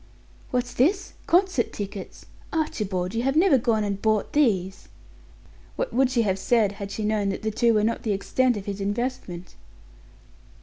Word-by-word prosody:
"What's 245 -1 -1
this? 375 +10 +1
Concert 355 - +2
tickets! 200 -1 -7 0.3
Archibald, 200 - -2
you 230 - 0
have 270 +3 0
never 330 -5 +5
gone 225 -2 +1
and 200 -1 -3
bought 215 -2 +1
these!" 195 -10 +1 0.9
What - - -3
would 265 0 +3
she 245 -3 +2
have 195 -2 0
said 220 -1 +2
had 200 -1 -7
she 215 +1 -4
known 210 -2 +1
that 195 - -4
the 220 - 0
two 230 +1 +2
were 210 - +3
not 230 +2 0
the 220 - -1
extent 245 +4 +1
of 200 - -7
his 200 -1 -4
investment? 205 -4 -3
220 Hz, 170 wpm, -25 LUFS, 200-255 Hz, 0.9 s, never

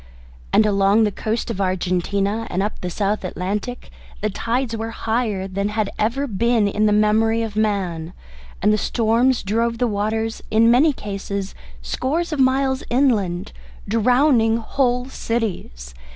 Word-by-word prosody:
And 215 - +5
along 200 +1 +3
the 210 - +1
coast 220 +4 -3
of 200 -3 -3
Argentina 195 +3 -1
and 185 +2 -1
up 210 - -4
the 180 - -3
South 200 +3 -1
Atlantic 200 +7 -4 0.3
the 215 0 -1
tides 235 +3 -2
were 225 0 -4
higher 220 -4 -2
than 200 +2 -2
had 210 -1 -1
ever 235 +7 0
been 230 -1 +1
in 210 +1 +1
the - - +3
memory 220 +2 +3
of 220 -2 -5
man, 185 -6 -1 0.5
and 210 +1 +4
the 215 - +1
storms 235 +4 +1
drove 230 +3 0
the 245 - +1
waters 220 +1 -2
in 230 +2 +4
many 285 +6 +5
cases 200 -4 -5 0.3
scores 310 - -2
of 300 - -3
miles 265 0 +2
inland, 215 -9 +1 0.4
drowning 230 +1 +3
whole 250 +1 0
cities. 195 - -4
220 Hz, 150 wpm, -21 LUFS, 200-235 Hz, 0.5 s, And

